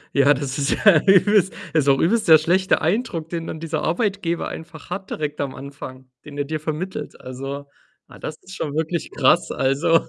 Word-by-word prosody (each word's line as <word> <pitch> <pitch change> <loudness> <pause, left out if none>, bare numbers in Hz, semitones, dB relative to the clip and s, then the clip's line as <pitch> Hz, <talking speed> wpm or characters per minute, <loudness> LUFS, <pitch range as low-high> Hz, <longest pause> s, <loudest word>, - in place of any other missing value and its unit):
Ja, 140 +1 +6
das 135 -1 -4
ist 140 - 0
ja 195 -7 +5
übelst 195 0 +5 0.2
ist 150 -3 +3
auch 135 - +5
übelst 215 +6 +2
der 160 -1 +9
schlechte 180 +5 +2
Eindruck, 165 - -1
den 165 -1 -4
dann 160 - -5
dieser 165 -1 -3
Arbeitgeber 180 -2 -1
einfach 160 0 -9
hat 190 +1 -5
direkt 150 -1 -3
am 140 -2 -3
Anfang, 135 -2 -9 0.2
den 145 -1 -10
er 145 - 0
dir 155 +2 -3
vermittelt. 155 +5 -5
Also, 135 +2 -6 0.4
ah, - - -15
das 155 - -5
ist 190 +1 -11
schon 150 -5 -4
wirklich 160 +1 -2
krass. 145 +5 +3
Also 140 +5 +2
160 Hz, 190 wpm, -22 LUFS, 140-175 Hz, 0.4 s, der